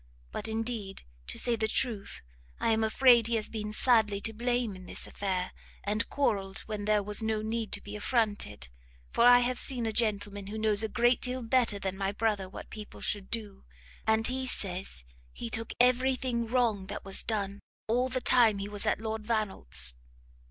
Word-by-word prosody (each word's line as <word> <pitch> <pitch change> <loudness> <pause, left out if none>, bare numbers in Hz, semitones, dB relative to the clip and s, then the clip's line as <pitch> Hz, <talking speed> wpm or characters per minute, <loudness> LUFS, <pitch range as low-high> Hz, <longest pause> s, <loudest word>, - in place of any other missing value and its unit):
But - - -3
indeed, 220 -3 -3 0.2
to - - -3
say 240 -1 +3
the 220 -1 -1
truth, 220 -3 -2 0.4
I 230 - +2
am 220 0 +2
afraid 235 +1 +5
he 235 - 0
has 215 -1 0
been 210 -1 -4
sadly 215 -3 +3
to 220 - 0
blame 240 -2 -1
in 185 0 -12
this - - -4
affair, 185 -2 -2 0.3
and 210 +3 -1
quarrelled 200 -8 -1
when 210 -2 -4
there 210 -1 +2
was 210 +2 -1
no 220 -1 -1
need 225 0 -3
to 205 - +2
be 205 0 -8
affronted; 210 - -1 0.4
for 235 - +3
I 245 0 +8
have 245 0 0
seen 250 -4 +1
a 220 - 0
gentleman 205 -3 -1
who 215 +2 -5
knows 215 -1 +4
a 220 - -1
great 240 +2 +2
deal 255 0 -1
better 230 -3 +2
than 190 -1 -4
my 195 0 0
brother 205 -3 -1
what - - -10
people 215 -1 -9
should 200 -2 -3
do, 210 -4 -4 0.4
and 220 0 +3
he 260 +1 0
says 185 - -2 0.3
he 65 - -7
took 225 0 -1
every 255 +2 +4
thing 240 -2 -2
wrong 225 -5 +1
that - - -6
was 195 - -3
done, 200 -2 -2 0.3
all 245 +3 +1
the 255 0 -2
time 230 -5 +5
he 200 0 -4
was 205 -1 -2
at - - +2
Lord 220 0 -4
Vannelt's." 190 - +2
220 Hz, 195 wpm, -30 LUFS, 200-235 Hz, 0.4 s, I